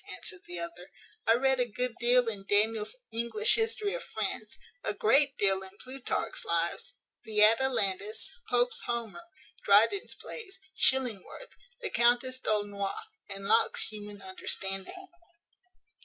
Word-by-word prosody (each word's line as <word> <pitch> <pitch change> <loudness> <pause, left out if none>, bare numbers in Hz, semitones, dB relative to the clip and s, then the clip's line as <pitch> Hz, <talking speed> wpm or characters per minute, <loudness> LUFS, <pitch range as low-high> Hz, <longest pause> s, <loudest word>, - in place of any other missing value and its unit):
answered 185 -1 -4
the 175 - -6
other. 170 +2 -5 0.4
"I 225 - +6
read 265 +1 +2
a 245 - +1
good 250 +2 0
deal 245 0 +4
in 200 -3 -4
Daniel's 210 - +2 0.2
English 235 - +1
History 445 -2 0
of - - -4
France; - - -4 0.3
a - - -2
great 285 -9 +3
deal 195 -1 +2
in 190 +1 -11
Plutarch's 260 0 -3
Lives, 485 +1 -1 0.3
the 210 -1 +3
Atalantis, 220 - +2 0.2
Pope's 245 0 +2
Homer, 235 +8 -4 0.4
Dryden's 405 -1 +3
Plays, 415 -4 -7 0.2
Chillingworth, 265 - +1 0.3
the 455 - -4
Countess 245 +2 +2
D'Aulnois, 205 -3 -2 0.3
and 195 0 -7
Locke's 225 +1 +3
Human 205 -2 -9
Understanding. 195 - -5
230 Hz, 125 wpm, -30 LUFS, 205-265 Hz, 0.4 s, I